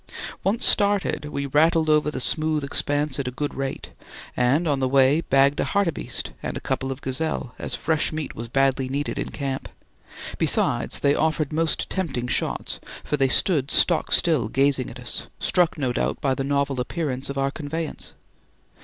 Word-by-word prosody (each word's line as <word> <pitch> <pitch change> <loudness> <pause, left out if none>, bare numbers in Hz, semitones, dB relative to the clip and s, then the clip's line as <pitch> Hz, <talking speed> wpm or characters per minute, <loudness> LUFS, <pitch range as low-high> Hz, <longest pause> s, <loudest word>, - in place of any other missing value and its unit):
Once 220 +6 +2
started, 200 -6 +3
we 140 -1 -3
rattled 160 +3 +3
over 150 -1 +3
the 140 - -4
smooth 155 +2 +1
expanse 145 0 0
at 135 - -2
a 125 - -6
good 145 -1 -2
rate, 135 -1 -5 0.4
and 135 +8 +2
on 145 -3 +1
the 130 - +1
way 135 +3 +4
bagged 140 -1 +3
a - - +2
hartebeeste 200 -5 -1
and - - -4
a - - -4
couple 135 0 -2
of 135 +2 -6
gazelle, 130 -1 -2
as - - -2
fresh 160 -1 0
meat 155 -2 -4
was 115 +1 -6
badly 135 +1 +1
needed 140 +2 -2
in - - -3
camp; 135 -2 -4 0.7
besides, - - +1
they 140 - +4
offered 155 -1 0
most 165 +1 0
tempting 140 -10 -3
shots, - - -2 0.2
for - - -1
they 135 -2 +2
stood 140 0 +2
stock 170 +1 +2
still 155 -10 +3
gazing 135 0 +2
at - - -10
us, - - -5
struck 175 -3 +2
no 130 -4 -1
doubt - - -1
by 135 -2 +1
the 135 - -2
novel 140 -1 0
appearance 135 -2 -3
of 140 - -4
our 135 0 +1
conveyance. 155 +1 -5
145 Hz, 180 wpm, -24 LUFS, 135-155 Hz, 0.7 s, way